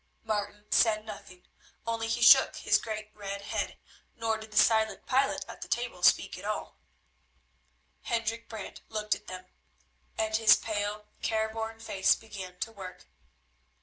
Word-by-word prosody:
Martin 210 -1 -3
said 215 -2 +3
nothing, 190 -4 -10 0.4
only 230 0 -1
he 235 +1 0
shook 240 - +8
his - - +3
great 215 -1 -5
red 200 -1 -6
head, - - -3 0.4
nor 225 -1 0
did 220 0 -9
the 210 - -7
silent 220 -1 +4
pilot 270 +2 +1
at - - -10
the - - -6
table - - -2
speak - - +4
at - - -11
all. - - -4 1.2
Hendrik 230 0 -2
Brant 220 -3 -8
looked 215 -1 0
at 210 - -8
them, 185 0 -7 0.7
and 220 0 0
his 225 0 +7
pale, 210 -1 -3 0.2
careworn 220 0 -2
face 195 -4 +3
began 195 -5 -9
to 225 - -2
work. 190 -4 -10
220 Hz, 150 wpm, -30 LUFS, 205-225 Hz, 1.2 s, shook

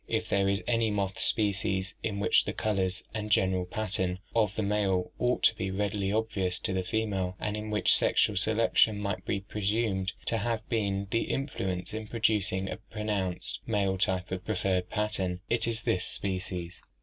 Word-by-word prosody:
If 110 -1 -1
there 100 0 +3
is 100 +1 0
any 115 -2 +2
moth 100 -2 -1
species 95 -2 +1
in 100 -2 -2
which 100 - +4
the - - -2
colors 95 -3 -1
and 105 -1 -3
general 95 -3 +3
pattern 95 -4 -1 0.2
of 105 -4 +2
the 110 - 0
male 100 -3 +1
ought 125 0 +1
to - - +6
be 95 -2 -2
readily 100 0 -1
obvious 100 -5 0
to 95 - -1
the 95 - +1
female, 95 -3 -1
and 105 0 -2
in 105 0 -4
which 105 0 +3
sexual 105 - +3
selection 110 +1 +3
might 100 -2 -2
be 100 - 0
presumed 100 -1 -1
to 115 - +1
have 115 0 -2
been 100 -3 0
the 115 - +1
influence 95 - -2
in 110 0 -4
producing 105 -4 +1
a - - -4
pronounced 105 -4 -3
male 100 -4 +1
type 95 -1 0
of 95 0 -3
preferred 95 -3 0
pattern, 95 -4 -1
it 115 -1 +2
is 115 -1 -2
this 90 - +1
species. 90 -3 -3
100 Hz, 175 wpm, -29 LUFS, 95-110 Hz, 0.2 s, to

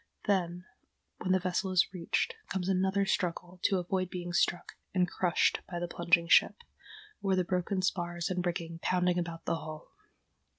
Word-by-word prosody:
Then, 180 -3 0 0.5
when 185 - -1
the 185 - +5
vessel 185 +1 -1
is 185 0 +2
reached, 180 - -1 0.2
comes 185 -2 -2
another 190 +1 +2
struggle 180 -1 -2
to 195 - +3
avoid 185 +1 -1
being 175 -1 -5
struck 175 0 +1 0.2
and 180 -1 +3
crushed 175 0 +2
by 175 - -4
the 175 0 -2
plunging 170 0 +2
ship, 475 - +4 0.6
or 195 -2 +2
the 185 - +2
broken 185 +1 -1
spars 175 -2 -1
and 180 -1 -1
rigging 170 -1 -3
pounding 180 0 +1
about 170 -1 -5
the 165 - 0
hull. 155 -1 -9
180 Hz, 165 wpm, -31 LUFS, 175-185 Hz, 0.6 s, the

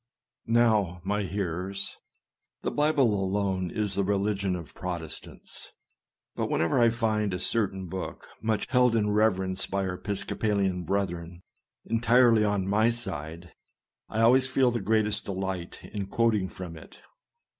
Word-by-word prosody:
Now, 110 -7 +3
my 105 +2 0
hearers, 95 0 -3 0.3
" - - -52
the - - -1
Bible 145 -6 +3
alone 95 -2 0
is 105 0 -2
the 100 - +1
religion 100 -1 0
of 85 -3 -8
Protestants; 85 -4 -7 0.3
" - - -62
but - - -2
whenever 85 +10 +1
I 120 -1 +6
find 110 -3 0
a - - -4
certain 95 -2 -1
book 95 +2 -6
much 110 -2 0
held 125 -2 +4
in 105 -2 +2
reverence 95 -3 +1
by 100 0 -1
our 95 - -2
Episcopalian 95 -1 -1
brethren, 85 -2 -2 0.4
entirely 115 0 +4
on 100 -2 0
my 110 +3 +3
side, 90 -7 -5 0.6
I 110 - -1
always 130 +3 +5
feel 130 -1 +3
the 120 -2 -2
greatest 105 +1 +1
delight 95 -2 -4
in 100 -2 -3
quoting 110 -2 +1
from 85 -3 -8
it. - - -14
100 Hz, 145 wpm, -28 LUFS, 95-110 Hz, 0.6 s, I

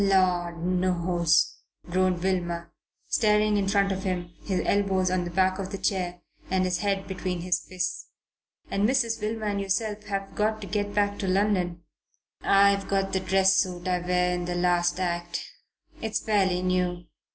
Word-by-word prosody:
"Lord 180 -3 +2
knows," 175 -2 +2 0.3
groaned 180 0 +1
Wilmer, 175 -2 -1 0.3
staring 210 -1 +3
in 200 -1 +1
front 200 0 +2
of 190 0 -2
him, 175 -3 -3
his 190 -3 -1
elbows 190 -2 +2
on 185 -1 0
the - - -4
back 185 +2 +1
of 190 -1 -4
the 195 - -3
chair 180 -3 -2 0.3
and 185 0 +1
his 180 -1 0
head 195 -1 -1
between 185 -2 -3
his 180 0 0
fists. 185 -1 -3 0.6
"And 200 +3 +2
Mrs. 230 -4 +1
Wilmer 215 +1 -2
and 200 -1 -1
yourself 210 +2 -2
have 195 -1 -4
got 215 +1 0
to - - -5
get 205 +1 -2
back 205 0 +1
to 195 - -2
London." 185 -3 +1 0.6
"I've 200 0 +4
got 195 0 0
the 190 - +2
dress 190 +1 +3
suit 180 -1 -1
I 180 -1 +1
wear 180 0 +1
in 175 0 -2
the 175 0 -2
last 175 0 +1
act. 175 -1 -2 0.6
It's 220 -1 -1
fairly 190 -4 +1
new. 180 -1 0
185 Hz, 170 wpm, -26 LUFS, 180-200 Hz, 0.6 s, I've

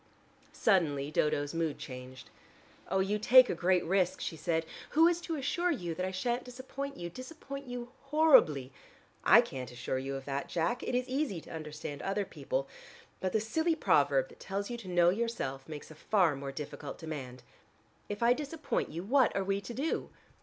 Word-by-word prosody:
Suddenly 150 -9 +2
Dodo's 145 -1 +1
mood 165 -3 -1
changed. 125 -3 -9 0.6
"Oh, 190 - +2
you 205 +2 0
take 255 +4 +7
a - - 0
great 180 +1 +2
risk," 185 +1 +1
she - - -3
said. 160 +1 -1 0.3
"Who 325 +1 +8
is 345 0 +1
to 330 -1 -3
assure 345 +5 0
you 175 - -2
that 180 +3 -2
I - - -1
shan't 240 +6 -1
disappoint 265 +3 -6
you, 175 - -4
disappoint 275 - -8
you 245 -1 -5 0.2
horribly? 270 - +5 0.5
I - - +8
can't 130 -1 -6
assure 125 +1 -3
you 135 +1 -4
of 135 0 -6
that, 140 0 -3
Jack. 175 +9 0
It - - -2
is 250 0 0
easy 260 - -1
to - - -13
understand 150 -2 -6
other 200 +1 -1
people, - - -3 0.5
but 185 - -1
the 220 - +2
silly 320 +10 +1
proverb - - +3
that - - -17
tells 200 +3 -4
you 240 - -3
to 225 -5 -10
know 175 -1 +4
yourself, 180 - -3
makes 150 0 -8
a - - -8 0.2
far 180 -8 +4
more 135 0 -5
difficult 145 0 -7
demand. 135 -6 -7 0.7
If 205 +2 -3
I 235 +1 +6
disappoint 300 +2 -2
you, 165 +3 -5
what 255 +5 +3
are 195 - +1
we 195 +1 0
to 240 - -7
do?" 300 +5 -1
190 Hz, 190 wpm, -32 LUFS, 150-255 Hz, 0.7 s, Who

